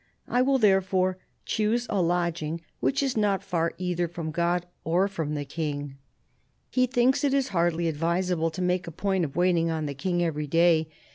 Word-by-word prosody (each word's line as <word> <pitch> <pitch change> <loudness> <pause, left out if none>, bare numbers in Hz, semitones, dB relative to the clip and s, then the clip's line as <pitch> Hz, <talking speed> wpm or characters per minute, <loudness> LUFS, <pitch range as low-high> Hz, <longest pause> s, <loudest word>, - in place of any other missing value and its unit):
I 245 - +2
will 270 +1 +3
therefore 190 -4 +2 0.3
choose 220 +3 0
a 200 -3 0
lodging 170 -2 -1 0.2
which 275 +1 +1
is 270 -2 -1
not 205 -3 +1
far 170 -4 -1
either 180 -1 -1
from 165 -1 -5
God 175 +2 0 0.2
or 175 +4 +2
from 160 -6 -3
the 145 -1 -3
King." 145 -2 -4 0.8
He 255 0 +3
thinks 255 +3 +2
it 280 -1 +2
is 270 -1 +1
hardly 170 -2 +1
advisable 165 +2 0
to 180 +3 -4
make 180 0 0
a - - -5
point 190 +2 0
of 140 - -8
waiting 175 -1 +2
on 160 -1 -2
the 145 - -3
King 175 +4 -1
every 150 -3 -2
day. 165 0 +3
175 Hz, 185 wpm, -26 LUFS, 165-195 Hz, 0.8 s, will